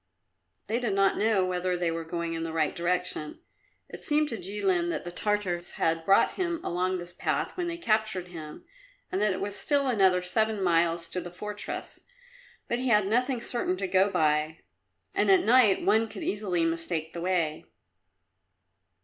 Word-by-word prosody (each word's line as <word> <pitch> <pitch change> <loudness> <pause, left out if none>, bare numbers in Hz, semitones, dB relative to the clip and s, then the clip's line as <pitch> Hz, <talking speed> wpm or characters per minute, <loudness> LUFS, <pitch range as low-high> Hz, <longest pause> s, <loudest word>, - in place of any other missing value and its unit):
They 230 +2 -1
did 235 -5 -1
not 195 0 +3
know 210 -4 +3
whether 180 0 -1
they 175 -1 0
were 165 0 -3
going 170 0 -3
in 165 - -3
the 165 0 -3
right 160 -1 0
direction. 175 -3 -2 0.5
It - - -10
seemed 300 0 +2
to 230 - -4
Jilin 190 -3 0
that - - -3
the 175 - -6
Tartars 185 -2 -1
had 165 0 0
brought 195 +2 +5
him 345 -3 -2
along 185 +1 -1
this 175 0 -8
path - - -2
when 355 -1 -2
they 340 0 -3
captured 215 - 0
him 155 -3 -9 0.5
and 190 - -1
that 210 -1 +3
it 185 - -3
was 200 0 -4
still 285 +2 +1
another 190 -7 +3
seven 215 +2 0
miles 170 -1 +2
to 180 - -3
the 175 - -7
fortress, 205 +4 -6 0.7
but 240 - -1
he 260 - -2
had 210 -4 +4
nothing 245 +5 +1
certain 235 -6 -1
to 195 - -2
go 190 +1 +3
by, 155 -3 +1 0.5
and 205 - +2
at 190 - +6
night 230 -4 +5
one 220 +3 +3
could - - -8
easily 185 -5 0
mistake 165 -1 -2
the 170 - -5
way. 170 -4 -1
185 Hz, 180 wpm, -28 LUFS, 170-215 Hz, 0.7 s, at